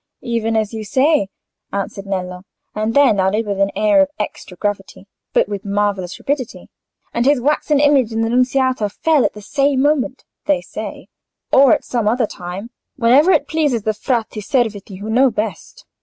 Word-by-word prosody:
"Even 230 -2 -1
as 220 0 0
you 220 -1 -5
say," 265 +1 +2 0.4
answered 195 0 -4
Nello; 180 -2 -4 0.3
and 215 +2 -2
then 270 -8 +5
added, 200 +4 +1
with 200 -1 -3
an 195 0 +3
air 215 +7 +4
of 285 - +2
extra 195 -3 -6
gravity, 200 -1 -4 0.3
but - - +2
with 200 -1 -5
marvellous 200 -3 -1
rapidity, 275 -4 -4 0.4
"and 235 - +1
his 285 -2 +4
waxen 295 +2 +1
image 285 -5 +3
in 225 0 -1
the 225 - 0
Nunziata 255 -2 +1
fell 305 +6 +2
at - - 0
the 210 - -11
same 275 +4 +1
moment, 285 -2 0 0.2
they 295 -2 +3
say; - - -8 0.5
or 270 -2 +7
at - - -1
some 235 -4 -1
other 235 +2 +2
time, 190 +4 -8 0.2
whenever 270 +8 +4
it - - +2
pleases 295 -9 0
the 215 - 0
Frati 225 -1 -2
Serviti, 205 -5 -2
who 210 - -6
know 255 +4 +4
best. 210 -6 -5
225 Hz, 175 wpm, -18 LUFS, 205-270 Hz, 0.5 s, or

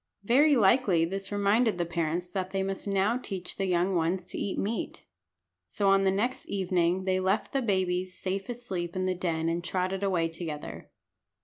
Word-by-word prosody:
Very 280 +8 +5
likely 200 -6 +4
this 195 +3 -4
reminded 205 +1 +2
the 175 - 0
parents 170 +1 -2
that 185 -1 -2
they 195 0 -1
must 195 +1 -4
now 200 +5 +1
teach 190 -7 -6
the 195 - -1
young 180 +1 +1
ones 175 +2 0
to - - -5
eat 200 - -2
meat. 220 +4 -3 0.6
So 200 -2 +2
on 195 0 +5
the 195 - +3
next 220 +7 -1
evening 185 -1 +1
they 185 0 +1
left 190 +2 0
the 275 - +1
babies 185 -4 0
safe 195 +3 -3
asleep 190 -8 -4
in 185 0 -1
the 185 - +1
den 165 -3 -1
and 170 +1 -1
trotted 185 +2 -1
away 185 -4 +1
together. 165 -2 -6
190 Hz, 185 wpm, -28 LUFS, 175-200 Hz, 0.6 s, Very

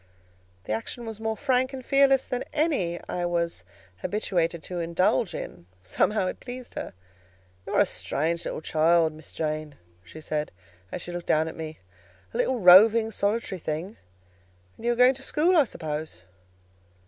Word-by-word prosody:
The 105 - -3
action 175 - -4
was 220 -1 -7
more 220 0 -2
frank 260 -1 +1
and 260 -2 -7
fearless 275 -1 +4
than 250 0 -3
any 280 - 0
I 175 - -3
was 170 - -1 0.3
habituated 170 - -1
to 180 -1 -5
indulge 180 +5 +1
in: 85 0 -7 0.2
somehow 190 - +1
it 185 - -4
pleased 250 0 -9
her. - - -6 0.7
"You - - -3
are - - +6
a - - +5
strange 165 +4 -2 0.2
child, 160 +1 +3
Miss 155 -1 -10
Jane," 155 -2 -3 0.3
she 125 - -12
said, 150 -1 -3 0.4
as - - -5
she 175 - -7
looked 175 0 -6
down 155 +1 +3
at 160 - -6
me; 155 -1 -6 0.6
"a - - -3
little 255 -2 +1
roving, 220 +4 +7
solitary 205 -2 -1
thing: 165 +7 -4 0.8
and 235 - -6
you 240 - +4
are - - -4
going 250 +2 +6
to 270 - -7
school, 325 +6 +2
I 305 -4 +6
suppose?" 155 -6 -6
180 Hz, 165 wpm, -26 LUFS, 160-240 Hz, 0.8 s, roving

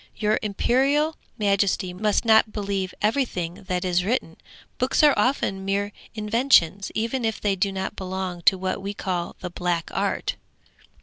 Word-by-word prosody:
'Your 215 0 +1
imperial 270 +9 +1 0.2
majesty 200 -2 +1
must 210 +4 0
not 220 -1 +5
believe 195 -3 -2
everything 210 -8 -1
that 180 0 -1
is 180 0 +2
written; 195 -6 -1 0.4
books 255 +4 +2
are 295 -2 +7
often 195 -7 0
mere 200 +1 -1 0.2
inventions, 210 -4 +3
even 230 +3 -1
if 225 -1 -1
they 200 -2 +1
do 195 +1 0
not 190 0 -4
belong 185 -2 -4
to 190 - +6
what 185 +1 -2
we 200 +1 -5
call 180 -3 -3
the 180 -2 -5
black 175 -2 -2
art!' - - -1
200 Hz, 150 wpm, -24 LUFS, 185-225 Hz, 0.4 s, are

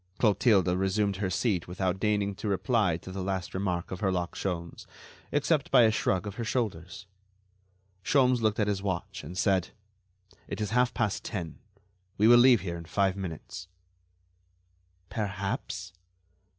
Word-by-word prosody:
Clotilde 105 -4 +3
resumed 95 +2 0
her 95 -1 -1
seat 95 -2 0
without 95 +1 -2
deigning 105 -1 +1
to 100 - -6
reply 100 -2 +1
to 95 - -10
the 95 +1 -5
last 95 -1 -3
remark 90 -2 -2
of 95 - -5
Herlock 90 -4 -1
Sholmes, 85 -3 -5 0.4
except 145 0 +1
by 125 -3 +6
a 110 - +5
shrug 95 -3 0
of 100 -1 -6
her 120 - -2
shoulders. 95 -7 -3 1.0
Sholmes 125 -1 +3
looked 110 -1 +1
at 105 - +3
his 100 -2 -1
watch 95 0 -4
and 85 +5 -8
said: 95 -2 +2 0.8
"It - - -5
is 105 -2 -2
half 125 +1 +2
past 110 -5 -1
ten. 85 -8 -5 0.6
We 105 - +4
will 120 +1 +8
leave 120 -4 +6
here 85 -2 -4
in 85 - -9
five 95 +2 +1
minutes." 95 0 -7 1.4
"Perhaps." 100 -3 -4
95 Hz, 150 wpm, -28 LUFS, 90-110 Hz, 1.4 s, will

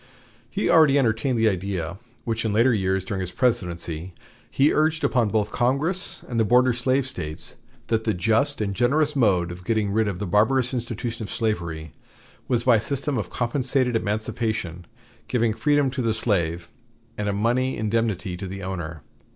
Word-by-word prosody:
He - - -1
already 155 -4 +6
entertained 120 0 +1
the 115 0 +3
idea 95 -3 -2 0.3
which 115 -1 -1
in 110 - 0
later 115 +4 +4
years 95 -2 0
during 100 -3 -3
his 90 - -3
presidency 90 -7 -1 0.3
he 140 +2 +3
urged 160 +1 +1
upon 120 -5 +2
both 105 0 0
Congress 145 +10 -1
and 120 -2 -2
the - - +4
border 125 +3 +4
slave 130 +2 +1
States, 80 -10 -5 0.3
that 110 -1 0
the 110 -3 0
just 110 +5 +1
and 100 -2 -1
generous 145 +7 +2
mode 95 -9 +2
of 90 +1 -9
getting 110 0 0
rid 110 +1 +2
of 100 -3 -2
the 105 - -3
barbarous 115 +7 +2
institution 120 -1 -4
of 105 - -5
slavery 85 -9 -3 0.5
was 120 -2 +1
by 120 -2 +5
a - - -1
system 140 +3 -2
of 95 - -4
compensated 125 0 0
emancipation 105 -5 -2 0.4
giving 115 -3 +1
freedom 145 +2 +2
to 130 0 -3
the 115 -2 +1
slave 85 -6 0 0.4
and 105 -1 -2
a - - +1
money 120 +6 0
indemnity 110 -4 -1
to 95 - -6
the 95 +1 -7
owner. 85 -5 -5
110 Hz, 175 wpm, -24 LUFS, 95-125 Hz, 0.5 s, already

